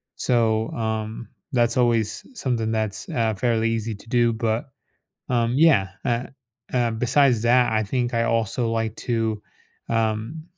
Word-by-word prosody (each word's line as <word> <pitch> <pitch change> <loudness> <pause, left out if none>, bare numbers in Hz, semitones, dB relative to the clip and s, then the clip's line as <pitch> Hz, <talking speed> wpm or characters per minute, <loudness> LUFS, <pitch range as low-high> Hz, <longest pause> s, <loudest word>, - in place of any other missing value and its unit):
So, 110 -2 +1
um, 110 0 -3 0.2
that's 120 -1 +2
always 115 -3 +1
something 115 -4 -1
that's, 110 -3 -2
uh, 115 -2 0
fairly 115 +2 +1
easy 115 0 -2
to 100 - -16
do, 120 -1 +3
but. 110 0 -1 0.6
Um, 120 -1 +1
yeah, 145 -12 +5 0.2
eh, 120 -1 0 0.5
uh, 120 -2 +2
besides 125 +1 +3
that, 120 +1 +4
I 110 0 +2
think 120 +3 -1
I 115 0 +2
also 115 +1 0
like 115 -1 -1
to 115 -3 0 0.5
um, 115 +6 -1
115 Hz, 140 wpm, -23 LUFS, 110-120 Hz, 0.6 s, yeah